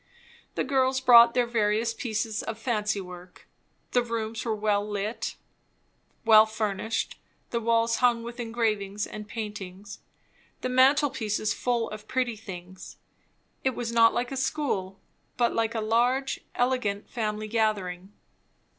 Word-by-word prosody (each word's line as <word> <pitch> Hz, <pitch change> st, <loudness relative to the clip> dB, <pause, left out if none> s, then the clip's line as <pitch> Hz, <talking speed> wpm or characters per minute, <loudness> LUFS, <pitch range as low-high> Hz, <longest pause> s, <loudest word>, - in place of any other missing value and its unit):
The -, -, 0 dB
girls 260 Hz, -1 st, +2 dB
brought 235 Hz, -2 st, +7 dB
their 245 Hz, -1 st, +3 dB
various 225 Hz, 0 st, +1 dB
pieces 220 Hz, -2 st, -2 dB
of 225 Hz, -, -5 dB
fancy 215 Hz, -3 st, -1 dB
work; 180 Hz, -1 st, -11 dB, 0.4 s
the 245 Hz, -, +3 dB
rooms 230 Hz, -2 st, -3 dB
were 225 Hz, -2 st, -1 dB
well 205 Hz, -1 st, +1 dB
lighted, 210 Hz, +2 st, -3 dB, 0.9 s
well 220 Hz, -1 st, +8 dB
furnished, 220 Hz, 0 st, -2 dB, 0.3 s
the 235 Hz, -, 0 dB
walls 230 Hz, 0 st, +2 dB
hung 240 Hz, -2 st, +3 dB
with 235 Hz, +1 st, -8 dB
engravings 215 Hz, -4 st, -1 dB
and 210 Hz, 0 st, -8 dB
paintings, 205 Hz, -2 st, -7 dB, 0.6 s
the 255 Hz, -, -2 dB
mantelpieces 255 Hz, -5 st, +2 dB
full 240 Hz, -2 st, 0 dB
of 215 Hz, 0 st, -9 dB
pretty 250 Hz, -3 st, 0 dB
things; 185 Hz, -3 st, -10 dB, 0.7 s
it 260 Hz, -2 st, +1 dB
was 235 Hz, -1 st, -3 dB
not 230 Hz, -1 st, +6 dB
like 245 Hz, +1 st, -2 dB
a 270 Hz, -, -3 dB
school, 255 Hz, -9 st, -2 dB, 0.4 s
but 240 Hz, -1 st, +2 dB
like 230 Hz, 0 st, 0 dB
a 225 Hz, -, 0 dB
large, 245 Hz, +5 st, +1 dB, 0.2 s
elegant 245 Hz, -5 st, 0 dB
family 215 Hz, -2 st, -3 dB
gathering. 205 Hz, -4 st, -1 dB
225 Hz, 135 wpm, -27 LUFS, 210-240 Hz, 0.9 s, well